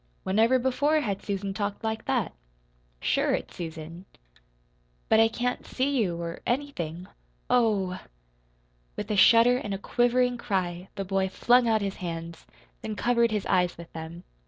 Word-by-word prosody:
Whenever 225 +7 +3
before 270 +5 +2
had 200 -7 -2
Susan 195 -1 -3
talked 205 +1 -3
like 220 0 -3
that? - - 0 0.7
"Sure - - +1
it's - - -7
Susan." 165 +1 -7 1.0
"But 220 - +5
I 225 - +6
can't 245 +2 -2
see 275 +2 -1
you 185 -9 0
or 170 0 -5
anything. 185 - -3 0.5
Oh 210 -6 +2
h!" - - -7 1.0
With 210 +1 -4
a - - +1
shudder 230 +5 +6
and 205 -5 -3
a - - -3
quivering 245 +3 +1
cry 180 -4 -2
the 195 - -3
boy 190 0 0
flung 240 +5 +3
out 220 -1 +2
his 195 -1 -3
hands, 165 -2 -6 0.3
then 215 - -4
covered 235 +1 +2
his 210 -3 -2
eyes 180 -2 +1
with 170 0 -12
them. 165 +2 -8
205 Hz, 160 wpm, -27 LUFS, 180-240 Hz, 1.0 s, I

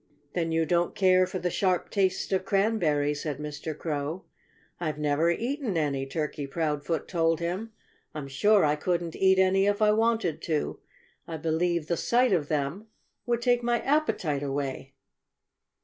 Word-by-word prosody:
"Then 165 -2 -1
you 160 0 +2
don't 170 +2 +1
care 185 -1 +4
for 185 +1 -4
the 180 -1 -2
sharp 185 -1 0
taste 190 -1 0
of 185 0 +1
cranberries," 165 -9 +1
said 150 -4 -3
Mr. 150 +1 -6
Crow. 155 +2 -3 0.5
"I've 155 -3 -2
never 150 +2 +1
eaten 235 - -1
any," 140 -3 -1
Turkey 150 0 -3
Proudfoot 150 +1 -2
told 165 -2 +1
him. 185 +7 -3 0.4
"I'm 145 -2 -5
sure 200 +8 +3
I 150 0 +2
couldn't 170 +1 -2
eat 190 0 +4
any 190 +1 +3
if 205 0 +1
I 215 -1 +4
wanted 225 -6 +1
to. 155 -3 -2 0.5
I 165 - -5
believe 165 +1 0
the 170 +1 -1
sight 245 -1 +2
of 155 -5 +1
them 155 +8 -2 0.4
would 240 0 0
take 245 -1 +3
my 240 0 +1
appetite 220 - 0
away." 135 -1 -4
170 Hz, 160 wpm, -27 LUFS, 150-195 Hz, 0.5 s, care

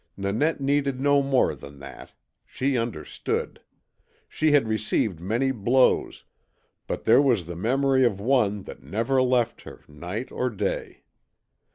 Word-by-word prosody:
Nanette 110 +13 0
needed 140 -1 0
no 140 +1 +3
more 135 -2 +2
than 70 0 -12
that. 70 0 -11 0.3
She 135 +1 -2
understood. 115 -10 -3 0.7
She 155 -1 0
had 145 -6 +4
received 110 -4 0
many 115 +9 0
blows, 125 +2 +1 0.6
but - - -4
there - - +5
was 120 - +2
the 85 +1 -7
memory 130 +7 +2
of 110 -6 +1
one 105 -4 +1
that - - -11
never 115 - 0
left 125 -2 +1
her, - - -12
night 90 - -6
or 125 - -1
day. 105 - -4
120 Hz, 140 wpm, -25 LUFS, 100-135 Hz, 0.7 s, there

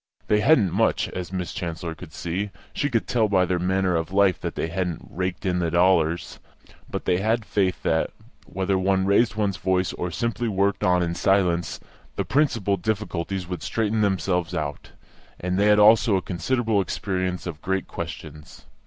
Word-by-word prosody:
They 105 - +2
hadn't 105 - +4
much, 110 +2 +1
as 90 -3 -6
Miss 90 -2 -3
Chancellor 85 -1 -4
could 80 0 -11
see; 90 +6 -3 0.2
she 140 - -1
could 115 -4 0
tell 115 -3 +2
by 95 -2 +3
their 90 0 0
manner 95 0 +1
of 80 0 -2
life 95 -2 +3
that - - -4
they - - -1
hadn't 85 -1 -3
raked 90 +1 -4
in 90 -1 +1
the 85 -1 0
dollars; 85 -1 +2 0.5
but - - -4
they 90 - +2
had 110 +2 0
faith 95 -4 0
that, 80 0 +1 0.4
whether 95 0 -1
one 95 0 +2
raised 100 +3 +3
one's 100 -3 0
voice 95 -1 0
or 90 - -3
simply 115 +6 -2
worked 100 -1 0
on 90 -1 +3
in 85 0 -1
silence, 90 -2 +1 0.4
the 100 - -2
principal 115 - +1
difficulties 95 -3 -3
would 90 -3 -5
straighten 110 +6 0
themselves 95 -4 0
out; 75 -2 -4 0.5
and 90 +1 -1
they 100 - +4
had 105 0 +5
also 105 0 +6
a 95 - +1
considerable 110 +3 0
experience 95 -1 -2
of 80 -4 -6
great 95 0 -1
questions. 75 -1 -8
95 Hz, 180 wpm, -24 LUFS, 90-105 Hz, 0.5 s, also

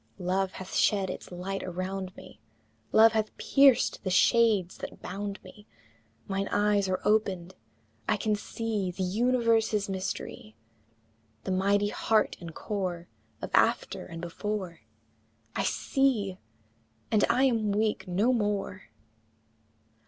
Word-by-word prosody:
Love 185 +1 -1
hath 185 0 -8
shed 195 -3 +2
its - - -9
light 190 +2 -4
around 185 +1 -4
me, - - -13 0.5
Love 225 +1 +7
hath 215 -1 -2
pierced 275 -3 +4
the 190 - -1
shades 205 -1 +3
that - - -7
bound 200 +1 -5
me; 210 +1 -15 0.6
Mine 195 0 -1
eyes 205 -2 +2
are 185 0 0
opened, 195 -4 +1 0.6
I 210 - +3
can 215 +1 0
see 210 -2 -3
The 185 +1 -3
universe's 225 0 +2
mystery, 185 - -5 0.9
The - - -3
mighty 200 +2 +2
heart 220 +1 +1
and 170 -3 -8
core 185 -5 -4 0.3
Of - - -4
After - - +2
and 165 0 -8
Before 185 0 -4 0.8
I - - 0
see, 200 - 0 0.7
and 215 -2 +3
I 245 +3 +3
am 225 -6 +2
weak 210 0 0
no 205 +8 +2
more! 205 - -2
200 Hz, 125 wpm, -28 LUFS, 185-220 Hz, 0.9 s, Love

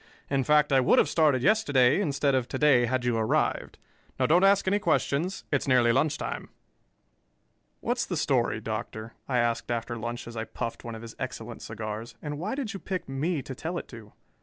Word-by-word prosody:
In 135 -1 +2
fact, 150 0 +3
I 135 - +6
would 125 - +4
have - - +5
started 150 -6 +2
yesterday 145 - +4
instead 145 -5 +1
of 130 -2 +1
to - - -4
day, 130 -4 +4
had 125 0 -1
you 120 -2 +1
arrived. 110 -1 0 0.4
Now - - +3
don't 175 +4 +4
ask 195 0 +4
any 200 +2 +3
questions; 180 0 0
it's 145 -1 0
nearly 125 -3 +4
lunch 145 +4 +1
time." - - -5 1.3
"What's - - -1
the - - -2
story, - - +1
Doctor?" 110 +1 -5
I 125 - 0
asked 120 0 0
after 120 0 -2
lunch 120 +1 -5
as 120 - -9
I 110 0 -3
puffed 115 - -5
one 115 -1 -6
of 110 - -9
his 115 - -9
excellent 120 -3 -6
cigars. 110 +2 -6
"And 145 +2 -5
why 210 +9 -2
did 255 -6 -3
you 195 - -6
pick 185 -1 -4
me 140 +3 -2
to 135 - -7
tell 165 +7 -4
it - - -6
to?" 110 -4 -11
130 Hz, 205 wpm, -27 LUFS, 120-155 Hz, 1.3 s, I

